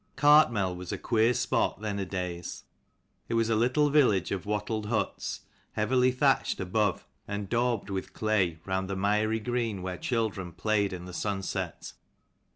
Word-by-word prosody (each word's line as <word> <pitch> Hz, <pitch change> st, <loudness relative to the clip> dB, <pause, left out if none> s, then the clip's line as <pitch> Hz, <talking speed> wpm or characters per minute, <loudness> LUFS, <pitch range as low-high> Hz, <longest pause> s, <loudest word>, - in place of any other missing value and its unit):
lARTMEL 120 Hz, -11 st, +5 dB
was 90 Hz, 0 st, -7 dB
a -, -, -2 dB
queer 115 Hz, 0 st, +2 dB
spot, 125 Hz, -, +1 dB
CHAPTER 105 Hz, -, -16 dB, 0.2 s
thenadays. 90 Hz, -2 st, -5 dB, 0.7 s
It -, -, 0 dB
was 115 Hz, 0 st, +2 dB
a -, -, +3 dB
little 130 Hz, +7 st, +3 dB
XLII. 150 Hz, +1 st, +6 dB
village 100 Hz, -9 st, +1 dB
of 100 Hz, 0 st, -3 dB
wattled 105 Hz, 0 st, -2 dB
huts, 110 Hz, 0 st, -2 dB, 0.3 s
heavily 125 Hz, +4 st, +3 dB
CARTMEL 125 Hz, -, -13 dB
thatched 135 Hz, -3 st, +2 dB
above, 95 Hz, +1 st, 0 dB, 0.2 s
and 100 Hz, 0 st, -4 dB
daubed 120 Hz, 0 st, +1 dB
CHURCH, -, -, -4 dB
with 95 Hz, -, -4 dB
clay, 100 Hz, -6 st, +1 dB
round 95 Hz, 0 st, -2 dB
the 100 Hz, -, -2 dB
miry 105 Hz, +3 st, +1 dB
[green 115 Hz, -4 st, -2 dB
where 90 Hz, -1 st, -4 dB
children 105 Hz, -7 st, -2 dB
played 100 Hz, +2 st, +1 dB
in 90 Hz, -1 st, -6 dB
the 90 Hz, -, -9 dB
sunset. 100 Hz, +1 st, -3 dB
105 Hz, 165 wpm, -29 LUFS, 95-115 Hz, 0.7 s, XLII